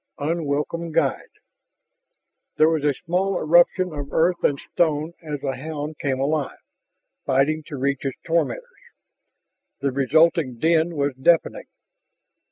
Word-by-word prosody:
7. 160 +4 -1
UNWELCOME 160 +3 -2
GUIDE - - 0 1.3
There 155 +1 +5
was 160 -3 0
a 145 -2 +2
small 185 +3 0
eruption 175 +2 +3
of 145 -1 -6
earth 170 +2 +1
and 140 - +2
stone 155 0 -1
as 150 -4 -5
the 135 -2 -2
hound 150 +2 -6
came 135 -2 -1
alive, 145 +1 -1 0.7
fighting 140 +4 +2
to 145 - -6
reach 140 +1 -1
its 135 -2 -3
tormentors. 170 - 0 1.2
The 140 -1 0
resulting 140 0 +2
din 165 +4 +2
was 140 -1 0
deafening. 170 - +1
155 Hz, 130 wpm, -23 LUFS, 140-165 Hz, 1.3 s, There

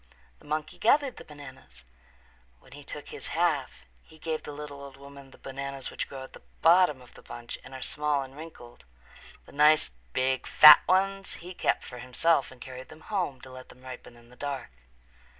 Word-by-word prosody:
The - - -20
monkey 155 +1 -3
gathered 275 +2 +3
the - - -9
bananas. 130 - -13 0.8
When - - -21
he 145 +2 -11
took 145 +1 -8
his - - -7
half 150 - 0 0.2
he 155 - -18
gave 160 0 -3
the - - -8
little 145 -1 -8
old 135 -1 -11
woman 140 0 -13
the - - -17
bananas 135 0 -6
which - - -4
grow 135 -1 -7
at 130 - -12
the - - -13 0.2
bottom 165 -6 +5
of 125 - -18
the - - -15
bunch 120 0 -8
and 130 +1 -11
are 130 - -6
small 150 -1 0
and 135 0 -12
wrinkled. 150 -6 -12 0.6
The - - -15
nice 150 - +5 0.2
big 130 0 0
fat 150 -1 +10
ones 195 +1 +1
he 180 +2 -9
kept - - 0
for 125 - -9
himself 135 +4 +1
and 130 - -15
carried 130 0 -9
them 155 0 -13
home 175 -11 -3
to 130 - -12
let 130 0 -11
them 125 - -16
ripen 125 -1 -10
in 120 0 -19
the 125 - -16
dark. 140 - -5
140 Hz, 200 wpm, -28 LUFS, 130-155 Hz, 0.8 s, fat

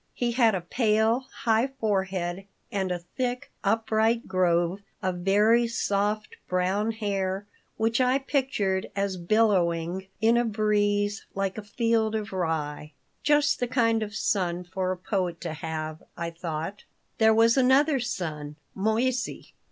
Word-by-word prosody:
He 240 -1 0
had 230 -3 +4
a 185 - -2
pale, 220 +5 +1 0.2
high 225 +2 +3
forehead 190 -3 -1 0.2
and 190 -2 -1
a 180 - 0 0.2
thick, 250 -1 -2
upright 225 +2 +1
grove 175 0 +1 0.2
of 185 -1 -1
very 210 +6 +4
soft, 210 -1 -1
brown 190 +4 +1
hair 200 -3 -2 0.3
which 225 +3 +1
I 255 +1 +3
pictured 260 -9 -1
as 200 -1 -1
billowing 180 -2 +1
in 230 +1 +4
a 240 - +3
breeze 205 -2 0
like 195 -1 -1
a - - -5
field 220 +1 0
of 215 -1 -4
rye. 155 -4 -2 0.3
"Just 295 0 +3
the 245 - 0
kind 230 -2 +2
of 210 -1 -4
son 180 -4 0
for 185 +1 -2
a 185 - -3
poet 180 -2 -2
to - - -4
have," 155 0 -5 0.2
I 170 0 -3
thought 165 +3 -5 0.4
There 220 0 +6
was 230 +1 +5
another 270 +2 +4
son, 155 -11 -4 0.2
Moissey. 235 +5 -1
205 Hz, 140 wpm, -27 LUFS, 185-230 Hz, 0.4 s, There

